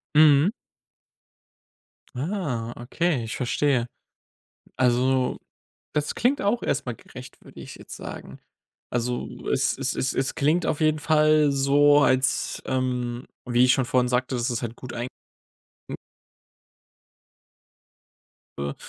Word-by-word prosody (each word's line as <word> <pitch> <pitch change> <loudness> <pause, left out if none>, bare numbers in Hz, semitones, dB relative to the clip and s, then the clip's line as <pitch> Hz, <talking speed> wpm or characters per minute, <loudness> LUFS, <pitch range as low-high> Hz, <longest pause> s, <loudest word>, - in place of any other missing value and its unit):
Mhm. 155 +4 +6 1.6
Ah, 130 - -3
okay, 135 +2 -1
ich 110 - -5
verstehe. 125 -1 +1 0.9
Also, 130 +1 +2 0.5
das 150 -1 -1
klingt 265 +4 +1
auch 210 +4 +1
erst - - -1
mal 125 - -3
gerecht, - - -13
würde - - -14
ich - - -10
jetzt - - -10
sagen. - - -9 0.5
Also, 125 0 -3
es - - +1
es - - -1
es 130 - -1
es 135 0 -1
klingt 160 +4 +1
auf 150 - -1
jeden 155 0 +2
Fall 155 -1 +3
so, 145 +2 +4
als, 130 -1 +1
ähm, 125 -1 -2 0.2
wie 120 0 +3
ich 125 - +5
schon 130 - +1
vorhin 125 0 +1
sagte, 125 +1 0
dass 120 0 -1
es 120 - -2
halt 120 -1 -5
gut 125 -1 -9
ein 120 +1 -3 0.8
n - - -4 2.6
äh, - - -3
130 Hz, 125 wpm, -25 LUFS, 125-150 Hz, 2.6 s, Mhm